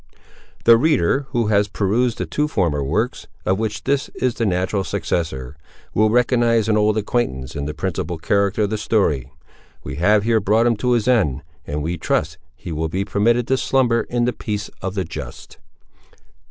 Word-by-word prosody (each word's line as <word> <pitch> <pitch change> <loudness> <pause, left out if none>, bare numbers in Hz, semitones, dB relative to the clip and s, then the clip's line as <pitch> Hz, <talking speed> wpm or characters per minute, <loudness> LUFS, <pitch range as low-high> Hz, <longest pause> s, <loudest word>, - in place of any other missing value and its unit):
The 115 0 +7
reader, 135 - +2
who 120 -4 0
has 100 0 +3
perused 110 +4 0
the - - -2
two 150 0 -1
former 85 - 0
works, 105 - -2 0.2
of 95 +2 +1
which 110 -1 -3
this 140 0 0
is 125 -2 0
the 115 - -1
natural 95 +2 0
successor, 80 -8 -3 0.4
will 110 +1 +3
recognise 120 -1 +2
an 110 - +2
old 105 0 +2
acquaintance 90 - -2
in 70 -1 -3
the 75 +1 -4
principal 90 -1 -3
character 100 +5 +1
of 100 - -1
the 110 - -1
story. 75 - 0 0.5
We 65 - -6
have 105 +5 +3
here 115 0 +3
brought 110 +3 +2
him 120 -1 +3
to 125 +3 +1
his 120 -1 +1
end, 80 - +2 0.2
and 75 +1 -3
we 85 +2 -3
trust 75 -1 -1 0.2
he 85 - -8
will 80 0 -2
be 95 +4 -2
permitted 115 +4 +1
to 130 - +3
slumber 125 -3 +2
in 120 -1 +1
the 125 - 0
peace 105 -1 -4
of 95 +1 -4
the 95 - 0
just. 75 -6 -9
105 Hz, 185 wpm, -21 LUFS, 85-115 Hz, 0.5 s, The